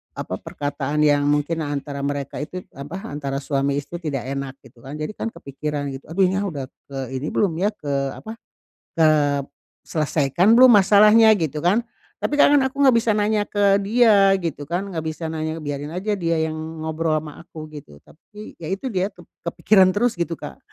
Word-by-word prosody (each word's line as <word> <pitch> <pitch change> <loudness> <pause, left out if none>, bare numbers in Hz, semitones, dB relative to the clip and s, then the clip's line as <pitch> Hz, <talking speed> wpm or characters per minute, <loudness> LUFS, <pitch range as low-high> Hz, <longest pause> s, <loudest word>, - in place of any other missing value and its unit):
apa, - - -4
perkataan 145 +1 -2
yang 145 -1 +3
mungkin 150 +3 0
antara 145 0 -4
mereka 140 -1 -4
itu, 180 +4 -6
apa, 150 +8 -7
antara 140 -1 -3
suami 140 -1 0
istri 170 +4 -8
tidak 145 -6 -3
enak, 140 -1 -4
gitu 120 - -19
kan. 140 +3 -7
Jadi 155 - -3
kan - - -3
kepikiran, 145 +1 -4
gitu. 135 - -10
Aduh 195 - +4
nyah, 195 +1 -1
udah 145 -6 -5 0.3
ke 135 - -7 0.2
ini 140 +4 -3
belum, 195 -6 +1
ya, 205 +3 +1
ke, 140 -6 -3
apa, 220 +1 -8 0.6
kep 145 -3 +3 0.4
selesaikan 155 - +2
belum, 255 -1 +9
masalahnya, 210 +2 +6
gitu 155 -2 -2
kan. 205 +7 +3 0.4
Tapi, - - 0
Kak, 290 - +5
kan 280 - +5
aku 275 +2 -2
nggak 260 -4 +6
bisa 225 -1 0
nanya 210 0 +1
ke 200 -1 +3
dia, 205 -3 +5
gitu 145 -4 -4
kan. 175 +4 -2
Nggak 160 -3 -4
bisa 160 +1 -4
nanya, 160 0 -4
biarin 145 +1 -5
aja 205 +3 -1
dia 165 -1 0
yang 155 - -5 0.3
ngobrol 160 0 -1
ama 150 -1 -6
aku, 155 -3 -10
gitu. 80 - -12
Tapi, 210 - -14
ya 160 - -7
itu 220 +7 -3
dia, 190 -1 0
kep 175 - -16 0.2
kepikiran 185 +2 +4
terus, 240 +3 +1
gitu, 170 -1 -1
Kak. 70 - -9
160 Hz, 190 wpm, -22 LUFS, 145-200 Hz, 0.6 s, belum